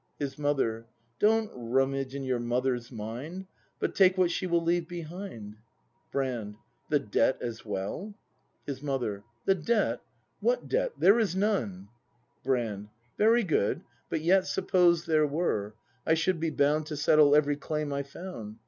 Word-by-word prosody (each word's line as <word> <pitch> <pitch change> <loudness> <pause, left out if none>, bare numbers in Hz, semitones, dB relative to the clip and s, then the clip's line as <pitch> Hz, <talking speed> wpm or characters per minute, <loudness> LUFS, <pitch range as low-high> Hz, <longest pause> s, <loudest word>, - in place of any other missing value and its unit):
His 145 0 -4
Mother. 125 -6 0 0.3
Don't 220 +1 +3
rummage 135 +2 -1
in 140 - -4
your 130 -2 0
Mother's 120 0 -1
mind, 125 - -6 0.3
But - - -2
take 190 -1 +5
what 180 -2 +3
she 185 - -2
will 170 -1 +2
leave 170 0 +1
behind. 170 - -7 0.5
Brand. 120 -6 -2 0.3
The 150 - +4
debt 130 0 +1
as 115 -2 -5
well 105 - -4 0.2
} - - -43
His 135 -2 -5
Mother. 125 -8 -2 0.2
The 195 - +5
debt? 210 +5 0 0.4
What - - 0
debt? - - 0
There 205 +5 +5
is 205 -6 +1
none. 115 - -1 0.5
Brand. 115 -6 -1 0.3
Very 230 +3 +5
good; 155 - +1 0.3
but 160 - -1
yet 185 +3 +3
Suppose 175 -3 +3
there 155 -2 +3
were, 110 - -1
— 120 - -38
I 160 - +5
should 165 +2 +1
be 165 0 0
bound 150 +1 +1
To 150 -1 -5
settle 150 -1 +5
every 145 -1 +3
claim 150 0 -3
I 140 - -1
found. 140 - -8
145 Hz, 155 wpm, -29 LUFS, 120-180 Hz, 0.5 s, take